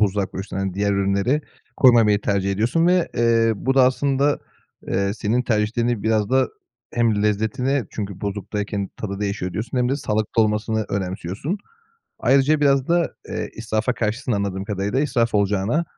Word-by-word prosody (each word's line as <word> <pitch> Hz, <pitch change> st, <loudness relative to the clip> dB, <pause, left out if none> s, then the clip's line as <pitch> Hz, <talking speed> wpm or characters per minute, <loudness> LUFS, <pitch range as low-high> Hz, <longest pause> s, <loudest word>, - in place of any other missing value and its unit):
buzluğa 100 Hz, -1 st, +2 dB
koyuyorsun. 95 Hz, +1 st, -7 dB
Hani, 95 Hz, -1 st, -2 dB
diğer 100 Hz, 0 st, +1 dB
ürünleri 100 Hz, +9 st, +1 dB, 0.4 s
koymamayı 115 Hz, -5 st, +5 dB
tercih 100 Hz, -1 st, 0 dB
ediyorsun 120 Hz, -, +1 dB
ve, 180 Hz, -1 st, +3 dB
eee, 115 Hz, -1 st, +3 dB
bu 135 Hz, +6 st, 0 dB
da 130 Hz, -2 st, +6 dB
aslında, 140 Hz, +2 st, +2 dB, 0.5 s
eee, 100 Hz, +1 st, 0 dB
senin 115 Hz, +3 st, 0 dB
tercihlerini 115 Hz, 0 st, 0 dB
biraz 110 Hz, -1 st, +1 dB
da 130 Hz, 0 st, +3 dB, 0.5 s
hem 115 Hz, -3 st, +2 dB
lezzetine 110 Hz, +5 st, 0 dB
çünkü, 100 Hz, -3 st, -5 dB
"Buzluktayken 100 Hz, 0 st, -3 dB
tadı 100 Hz, -2 st, -5 dB
değişiyor." 100 Hz, -3 st, -2 dB
diyorsun 115 Hz, +6 st, -3 dB
hem 125 Hz, -, +2 dB
de 135 Hz, -, +1 dB
sağlıklı 110 Hz, -3 st, 0 dB
olmasını 110 Hz, +1 st, 0 dB
önemsiyorsun. 95 Hz, -, -3 dB, 0.6 s
Ayrıca 140 Hz, +4 st, +3 dB
biraz 140 Hz, -2 st, +3 dB
da, 170 Hz, 0 st, +1 dB
eee, -, -, -4 dB
israfa 110 Hz, +2 st, -1 dB
karşısın 115 Hz, +3 st, -2 dB
anladığım 100 Hz, -2 st, -2 dB
kadarıyla. 100 Hz, +4 st, -1 dB
"İsraf 120 Hz, -6 st, 0 dB
olacağına, 105 Hz, -, +1 dB
110 Hz, 150 wpm, -22 LUFS, 100-125 Hz, 0.6 s, da